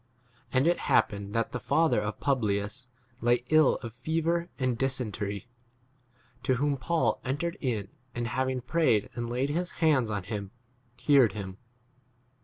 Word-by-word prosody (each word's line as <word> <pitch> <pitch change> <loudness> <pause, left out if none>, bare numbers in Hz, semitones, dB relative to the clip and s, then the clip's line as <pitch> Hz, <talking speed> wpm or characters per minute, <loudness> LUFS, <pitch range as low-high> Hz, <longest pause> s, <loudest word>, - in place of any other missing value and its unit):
And 130 +2 +3
it 175 +1 +3
hap - - +3
pened 100 0 -7
that 115 0 0
the 125 - -3
father 160 -3 +2
of 105 0 -4
Publius 110 -2 0 0.3
lay 120 +1 +3
ill 155 -2 +6
of 115 -2 -6
fever 165 +6 -1
and 130 -2 0
dysentery, 115 -5 -2 0.9
to 130 - +2
whom 145 +2 +1
Paul 135 -4 0
entered 150 +7 -2
in, 110 -7 -1 0.3
and 120 -1 -2
having 130 +1 -1
prayed 125 -6 +2
and 120 -1 -4
laid 130 +4 0
his 175 +3 -1
hands 145 -8 +3
on 105 -3 -2
him 100 +1 -4
9 95 - -16 0.5
cured 130 -3 +5
him. 95 -2 -6
125 Hz, 155 wpm, -29 LUFS, 110-145 Hz, 0.9 s, ill